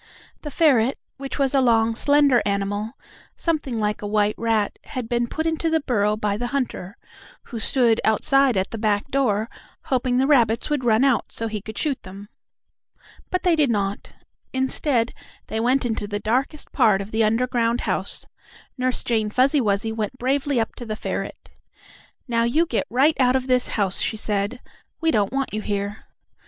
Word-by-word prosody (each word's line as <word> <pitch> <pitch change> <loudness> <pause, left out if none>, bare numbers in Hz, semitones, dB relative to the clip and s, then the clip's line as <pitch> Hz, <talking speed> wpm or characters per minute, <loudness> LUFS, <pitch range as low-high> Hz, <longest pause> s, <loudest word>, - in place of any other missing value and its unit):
The 300 - -6
ferret, 270 -5 +3 0.2
which 275 0 -6
was 275 -2 +1
a 270 - +4
long, 230 -2 +3
slender 285 0 +4
animal, 205 +2 -2 0.4
something 295 -8 -1
like 210 0 -1
a 205 - -4
white 210 0 +2
rat, 225 -3 0
had 250 -3 -5
been 240 0 0
put 315 +6 -3
into 325 0 0
the 320 0 +2
burrow 210 -6 +1
by 210 -2 -1
the 245 +2 -3
hunter, 240 -7 -3 0.5
who 235 - -7
stood 235 -1 +2
outside 260 +2 +3
at 190 - -1
the 225 - -5
back 210 +2 0
door, 225 -6 +1 0.4
hoping 255 -1 0
the 260 - +3
rabbits 240 -2 +2
would 290 -3 0
run 230 0 +3
out 270 -5 +1
so 225 - -3
he 215 -2 -4
could 220 +2 -9
shoot 290 -4 -1
them. 195 +2 -11 1.0
But 365 - -1
they 355 -3 +4
did 300 -4 +3
not. 200 -2 -2 0.4
Instead, 260 -2 0 0.3
they 220 - -3
went 250 +3 +2
into 220 -3 -2
the 205 0 -3
darkest 255 +8 -2
part 220 -7 +3
of 200 +2 -6
the 220 0 +2
underground 235 +1 +1
house. - - 0 0.5
Nurse 255 0 0
Jane 220 -3 0
Fuzzy 265 +6 +3
Wuzzy 210 0 0
went 220 +2 -4
bravely 270 +1 0
up 225 - -1
to 240 - -7
the 215 - -3
ferret. - - -5 0.8
"Now 230 -1 +1
you 295 +9 +2
get 240 - -2
right 275 +7 +3
out 250 0 +4
of 260 -1 0
this 255 -1 +1
house," 195 -3 0
she 220 - -1
said. 210 +3 -2 0.4
"We 325 -1 +2
don't 205 -7 +1
want 270 -3 -2
you 215 - -2
here!" 205 0 -4
235 Hz, 180 wpm, -23 LUFS, 215-265 Hz, 1.0 s, a